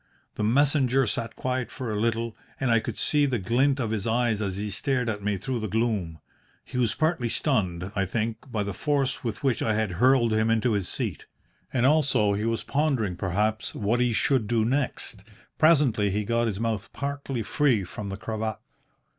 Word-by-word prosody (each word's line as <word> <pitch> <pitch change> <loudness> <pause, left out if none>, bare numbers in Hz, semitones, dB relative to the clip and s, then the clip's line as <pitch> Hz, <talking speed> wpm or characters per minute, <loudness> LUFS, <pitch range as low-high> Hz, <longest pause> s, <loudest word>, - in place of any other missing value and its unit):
"The - - -3
messenger 135 +2 +3
sat 115 +1 -3
quiet 130 -1 -2
for 125 -5 -5
a - - -2
little, 115 0 -1 0.2
and 130 -3 +1
I 115 - +5
could - - -5
see 145 -1 +2
the 130 -3 0
glint 130 +8 +2
of 115 -4 -1
his 110 -1 -2
eyes 115 -2 +1
as 95 -2 -2
he 105 +1 -3
stared 125 +5 0
at 105 -2 -3
me 105 0 -1
through 125 +5 -3
the 110 - -3
gloom. 105 -7 -1 0.5
He 125 - -4
was 120 -3 +1
partly 155 -7 0
stunned, 95 - 0
I 95 -1 0
think, 115 +4 -3
by 105 -3 0
the 100 0 -4
force 140 - 0
with 115 -1 -4
which 135 -4 +1
I 110 - +1
had 110 -3 0
hurled 125 -3 +4
him 110 +1 +2
into 115 +2 +2
his 100 -4 -1
seat. - - -3 0.4
And 125 -1 +1
also 135 -8 +3
he 105 +2 -1
was 115 0 -1
pondering, 135 - 0
perhaps, 105 +5 -1
what 110 +3 0
he 125 -1 +2
should 115 0 +1
do 110 0 +2
next. 125 -5 -1 0.4
Presently 140 -10 +4
he 105 +2 -1
got 115 +1 +1
his 105 -3 -3
mouth 110 -3 -2
partly 140 -4 -3
free 125 -3 +2
from 100 +3 -6
the 95 - -5
cravat. 110 0 -3
115 Hz, 195 wpm, -26 LUFS, 105-130 Hz, 0.5 s, I